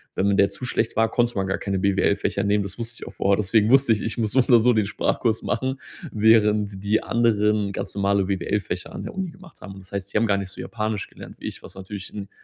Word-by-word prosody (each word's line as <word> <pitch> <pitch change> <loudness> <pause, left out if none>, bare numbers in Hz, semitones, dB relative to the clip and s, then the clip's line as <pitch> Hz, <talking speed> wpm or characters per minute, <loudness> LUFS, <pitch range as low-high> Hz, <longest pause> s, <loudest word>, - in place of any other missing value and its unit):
Wenn 100 +2 +2
m 100 - +1
der 100 - +4
zu 100 +6 -8
schlecht 115 -2 -1
war, 115 0 +2
konnte 120 0 +1
man 95 -1 0
gar 95 - -1
keine 100 -1 -2
BWL-Fächer 100 0 +1
nehmen, 100 0 +2
das 100 +3 -8
wusste 115 0 -5
ich - - -9
auch - - -9
vorher. 100 0 +2
Deswegen 105 +1 +2
wusste 135 -1 +5
ich, 110 - -2
ich 110 - -2
muss 110 -3 0
so 130 - +3
oder 120 -2 +5
so 120 +2 +4
den 110 -3 +1
Sprachkurs 110 +2 0
machen, 130 +6 -2 0.3
während 105 -2 +3
die 105 +2 +1
anderen 105 -3 +2
ganz - - -5
normale 100 -1 +2
BWL-Fächer 95 -1 -2
an - - -6
der - - -6
Uni 190 -1 -3
gemacht 185 0 -17
haben. 95 +1 -9
Das 95 -1 -12
heißt, 100 -1 -5
die - - +2
haben 115 +1 +2
gar 100 -1 +2
nicht 100 -1 -4
so - - -13
Japanisch 110 -2 -3
gelernt - - -12
wie - - -10
ich, - - -7
was - - -12
natürlich 95 0 -8
'n 100 -2 -7
105 Hz, 255 wpm, -23 LUFS, 100-115 Hz, 0.3 s, wusste